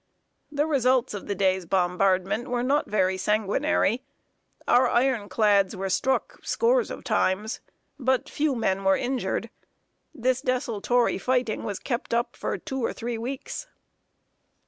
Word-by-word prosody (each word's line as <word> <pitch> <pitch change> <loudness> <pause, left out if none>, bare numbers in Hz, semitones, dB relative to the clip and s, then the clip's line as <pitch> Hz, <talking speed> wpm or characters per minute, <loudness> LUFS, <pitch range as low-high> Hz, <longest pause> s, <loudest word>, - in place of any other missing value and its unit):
The 295 0 +1
results 260 -6 +2
of 205 - -6
the 200 - -1
day's 190 -2 +1
bombardment 190 +5 +1
were 245 0 -1
not 285 +4 +1
very 190 -3 +1
sanguinary. 215 +4 +1 0.7
Our 250 0 +5
iron 240 -5 +1
clads 200 -1 +3
were 190 0 -3
struck 265 +7 0
scores 485 +1 +2
of - - -7
times, 210 +4 0 0.4
but 260 -1 +1
few 295 -2 0
men 195 -4 0
were 195 0 +4
injured. 255 0 -2 0.6
This 255 -3 0
desultory 245 -3 0
fighting 250 -1 0
was 200 -2 -3
kept 240 -2 -3
up 235 +1 -1
for - - -3
two 265 -2 -5
or - - 0
three 235 -1 -4
weeks. 265 - -5
235 Hz, 140 wpm, -26 LUFS, 195-260 Hz, 0.7 s, Our